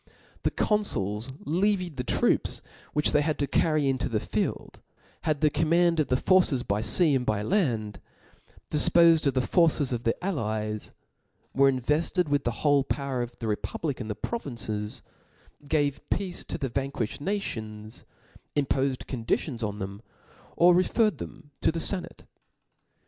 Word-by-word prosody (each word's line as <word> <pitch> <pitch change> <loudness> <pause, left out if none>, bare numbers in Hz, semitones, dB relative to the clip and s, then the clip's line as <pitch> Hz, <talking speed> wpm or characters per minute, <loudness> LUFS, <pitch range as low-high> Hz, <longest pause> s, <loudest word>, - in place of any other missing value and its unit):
The - - +1
confuls 115 - 0
levied 180 0 0
the 125 - -2
trot^ - - +1 0.3
which 150 0 +2
tbey 150 - +3
wcrd 150 -1 0
to 140 - 0
carry 155 0 +1
into 130 0 0
the 110 -3 0
field; - - -3 0.5
had 150 -2 0
the 150 -1 +4
command 165 +2 +2
of 155 - +2
the 125 - +2
forces 175 -7 +3
by 105 -1 -1
fea 155 +6 +3
and 130 - +1
land^ 110 - 0 0.7
difpofed 165 +1 +5
of 135 - +1
the 130 - +1
forces 155 -6 +3
of 120 - -2
the 115 - +1
allies; 110 - -2 0.6
were 135 +1 +5
invefted 150 +6 0
with 145 0 +1
the - - +2 0.2
whole, 145 -2 +5
power 135 -3 -2
of 120 0 -6
the 115 - -6
republic 130 +6 -3
in 110 - -5
the 105 - -3
provinces 110 - -4 0.6
5 145 - -18
gave 145 -3 0
pedce 185 -1 -2
to - - -3
the 135 -6 -3
vanquifhed 135 -3 -3
nations, 110 - -4 0.5
impofed 135 -2 0
conditions 120 +1 -2
on 105 -2 -2
theixii 100 +1 -6 0.6
or 175 +1 +7
referred 185 - +2
them 145 -2 -9
to - - +3
the 165 - -5
fenate. 185 +2 -3
140 Hz, 155 wpm, -27 LUFS, 115-165 Hz, 0.7 s, or